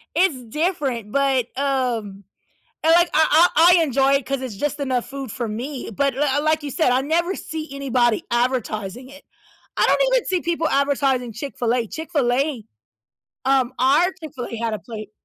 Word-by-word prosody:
It's 310 Hz, -10 st, +2 dB
different, 270 Hz, -, -2 dB
but, 270 Hz, -3 st, +1 dB
um 245 Hz, -8 st, -2 dB, 0.6 s
and, 325 Hz, +1 st, +5 dB
like, 345 Hz, 0 st, +5 dB
I 315 Hz, +2 st, +5 dB
I 340 Hz, +3 st, +7 dB
I -, -, +3 dB
enjoy 275 Hz, -1 st, +2 dB
it 275 Hz, -2 st, +1 dB
'cause 270 Hz, -1 st, -2 dB
it's 245 Hz, -6 st, -6 dB
just 295 Hz, +6 st, -3 dB
enough 255 Hz, -3 st, -2 dB
food 270 Hz, -4 st, -6 dB
for 235 Hz, -2 st, -4 dB
me, 245 Hz, +5 st, -5 dB
but 275 Hz, -2 st, +1 dB
l 290 Hz, -, 0 dB
uh, 290 Hz, +1 st, +1 dB
like 310 Hz, -1 st, +1 dB
you 285 Hz, -, -5 dB
said, 280 Hz, -4 st, +2 dB
I 255 Hz, +1 st, +2 dB
never 340 Hz, +6 st, 0 dB
see 315 Hz, -4 st, -7 dB
anybody 245 Hz, -5 st, +1 dB
advertising 240 Hz, -1 st, -2 dB
it. 285 Hz, +1 st, -14 dB, 0.5 s
I -, -, +4 dB
don't -, -, +3 dB
even -, -, +1 dB
see 370 Hz, -3 st, 0 dB
people 330 Hz, -1 st, -1 dB
advertising 275 Hz, -4 st, +1 dB
Chick-fil-A. 240 Hz, -2 st, -2 dB
Chick-fil-A, 275 Hz, -4 st, -1 dB, 0.8 s
um, 265 Hz, -2 st, +2 dB
our 295 Hz, +9 st, +3 dB
Chick-fil-A 260 Hz, -6 st, -7 dB
had 225 Hz, -1 st, -2 dB
a -, -, -4 dB
plate. 215 Hz, +2 st, -9 dB
270 Hz, 175 wpm, -22 LUFS, 240-300 Hz, 0.8 s, I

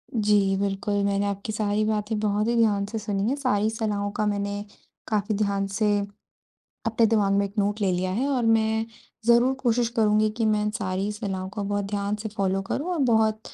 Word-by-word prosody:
जी, 205 Hz, -3 st, +3 dB
बिल्कुल 200 Hz, +1 st, -1 dB
मैंने 200 Hz, 0 st, +1 dB
आपकी 200 Hz, +2 st, -3 dB
सारी 210 Hz, 0 st, 0 dB
बातें 215 Hz, 0 st, -1 dB
बहुत 210 Hz, +1 st, 0 dB
ही 235 Hz, -, +1 dB
ध्यान 210 Hz, -4 st, +2 dB
से 225 Hz, -, -2 dB
सुनी 205 Hz, -1 st, -2 dB
हैं, 275 Hz, -, +1 dB
सारी 220 Hz, -7 st, +1 dB
सलाहों 210 Hz, -2 st, -2 dB
का 215 Hz, -, -1 dB
मैंने 205 Hz, 0 st, -2 dB, 0.4 s
काफ़ी 210 Hz, 0 st, 0 dB
ध्यान 200 Hz, -2 st, 0 dB
से 205 Hz, +1 st, +1 dB, 0.9 s
अपने 225 Hz, 0 st, +3 dB
दिमाग़ 210 Hz, -3 st, +2 dB
में 200 Hz, -, +2 dB
एक 200 Hz, -, -13 dB
नोट 205 Hz, +1 st, 0 dB
ले 195 Hz, -2 st, +2 dB
लिया 185 Hz, +1 st, -1 dB
है। 245 Hz, +7 st, 0 dB
और 260 Hz, -4 st, 0 dB
मैं 220 Hz, 0 st, +2 dB, 0.4 s
ज़रूर 240 Hz, +2 st, +5 dB
कोशिश 235 Hz, -1 st, +2 dB
करूँगी 215 Hz, -1 st, +3 dB
कि 230 Hz, -, 0 dB
मैं 210 Hz, -1 st, +2 dB
इन 210 Hz, -, 0 dB
सारी 195 Hz, -1 st, -2 dB
सलाहों 195 Hz, -3 st, -4 dB
का 205 Hz, +1 st, -5 dB
बहुत 205 Hz, 0 st, -1 dB
ध्यान 205 Hz, 0 st, -1 dB
से 215 Hz, +1 st, -5 dB
फ़ॉलो 195 Hz, -2 st, -1 dB
करूँ 285 Hz, -, -3 dB
और 345 Hz, -, -2 dB
बहुत 220 Hz, -2 st, +2 dB
210 Hz, 200 wpm, -25 LUFS, 200-220 Hz, 0.9 s, ज़रूर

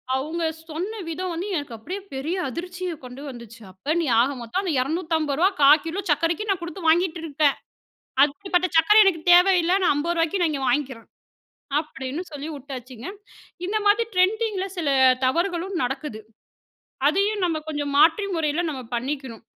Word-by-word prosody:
அவங்க 315 Hz, +5 st, -3 dB, 0.3 s
சொன்ன 385 Hz, +7 st, -4 dB
விதம் 365 Hz, +2 st, -3 dB
வந்து 350 Hz, +5 st, -4 dB
எனக்கு 285 Hz, -6 st, -4 dB
அப்டியே 370 Hz, -, -6 dB
பெரிய 295 Hz, +7 st, -2 dB
அதிர்ச்சிய 360 Hz, +4 st, -5 dB
கொண்டு 250 Hz, +3 st, -9 dB
வந்துச்சு. 235 Hz, -2 st, -11 dB
அப்ப 280 Hz, -, -3 dB
நீ -, -, -1 dB, 0.2 s
ஆக 260 Hz, -, +2 dB
மொத்தம் 235 Hz, -, -3 dB
அந்த 345 Hz, -5 st, -1 dB
ரூ.250 320 Hz, +3 st, 0 dB
1/4 325 Hz, +6 st, +4 dB
சர்க்கரைக்கு 335 Hz, +8 st, 0 dB
நான் 370 Hz, -, -2 dB
குடுத்து 340 Hz, 0 st, -5 dB
வாங்கிட்டுருப்பேன். 320 Hz, -4 st, +2 dB, 0.7 s
அப்டிப்பட்ட 360 Hz, +5 st, +1 dB
சர்க்கர 370 Hz, +7 st, +5 dB
எனக்கு 350 Hz, -5 st, +2 dB
தேவ 360 Hz, +2 st, +7 dB
இல்ல 345 Hz, -, +1 dB
நான் 345 Hz, -, +3 dB
ரூ.50க்கு 335 Hz, +4 st, 0 dB
நான் 330 Hz, -, +2 dB
இங்க 275 Hz, -2 st, -3 dB
வாங்கிக்குறேன், 260 Hz, -3 st, -2 dB, 0.7 s
அப்டின்னு 295 Hz, 0 st, -5 dB
சொல்லி 290 Hz, +2 st, -6 dB
வுட்டாச்சுங்க. 255 Hz, -1 st, -8 dB, 0.6 s
இந்த 430 Hz, +2 st, 0 dB
மாரி 440 Hz, +3 st, +4 dB
ட்ரெண்டிங் 415 Hz, +2 st, +2 dB
ல -, -, -3 dB
சில 315 Hz, -4 st, 0 dB, 0.4 s
தவறுகளும் 345 Hz, +6 st, 0 dB
நடக்குது, 250 Hz, -3 st, -4 dB, 0.9 s
அதையும் 400 Hz, +3 st, 0 dB
நம்ம 325 Hz, -2 st, 0 dB
கொஞ்சம் 290 Hz, -2 st, -3 dB
மாற்றி 330 Hz, +6 st, +5 dB
முறையில 310 Hz, 0 st, 0 dB
நம்ம 260 Hz, -3 st, -6 dB
பண்ணிக்கணும். 260 Hz, -2 st, -4 dB
325 Hz, 145 wpm, -24 LUFS, 280-365 Hz, 0.9 s, தேவ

